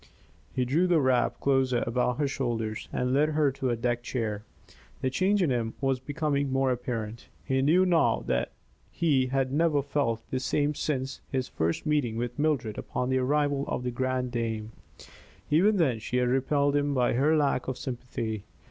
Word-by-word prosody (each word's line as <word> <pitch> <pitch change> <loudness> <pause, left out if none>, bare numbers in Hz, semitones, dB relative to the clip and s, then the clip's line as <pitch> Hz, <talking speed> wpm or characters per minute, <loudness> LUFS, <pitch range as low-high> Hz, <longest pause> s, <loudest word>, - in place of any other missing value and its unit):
He 125 - 0
drew 160 +9 +2
the 175 -3 +4
wrap 130 -3 +2
closer 130 -3 +2
about 125 +1 0
her 145 -1 +1
shoulders 115 -5 -3
and 125 0 -1
led 150 +3 +3
her 150 -2 +2
to 135 -1 -2
a 120 - +1
deck 120 +1 -1
chair. 110 -4 -3 0.6
The 130 - 0
change 190 +6 +2
in 155 - +1
him 115 -2 -1
was 135 -2 0
becoming 145 0 -1
more 135 0 +2
apparent. 120 -2 -4 0.2
He 130 0 +1
knew 170 +7 +4
now 175 -3 +2
that 65 0 0 0.4
he 140 -6 +1
had 135 0 0
never 150 -2 +2
felt 125 -6 -1
the 130 - 0
same 145 +3 0
since 135 -2 -3
his 130 -2 -1
first 80 - -2
meeting 145 -7 +1
with 120 +2 -3
Mildred 135 -8 0
upon 125 - -3
the 130 0 +2
arrival 145 +1 +1
of - - -2
The 125 - -2
Grande 130 0 -1
Dame. 110 -2 -3 0.8
Even 200 +7 +4
then 135 -10 +2
she 125 +3 -2
had 125 -1 +2
repelled 140 +2 +2
him 145 0 +1
by 125 -1 +2
her 145 +6 +3
lack 140 -4 +1
of 130 -1 -3
sympathy. 115 -4 -4
130 Hz, 185 wpm, -28 LUFS, 120-145 Hz, 0.8 s, the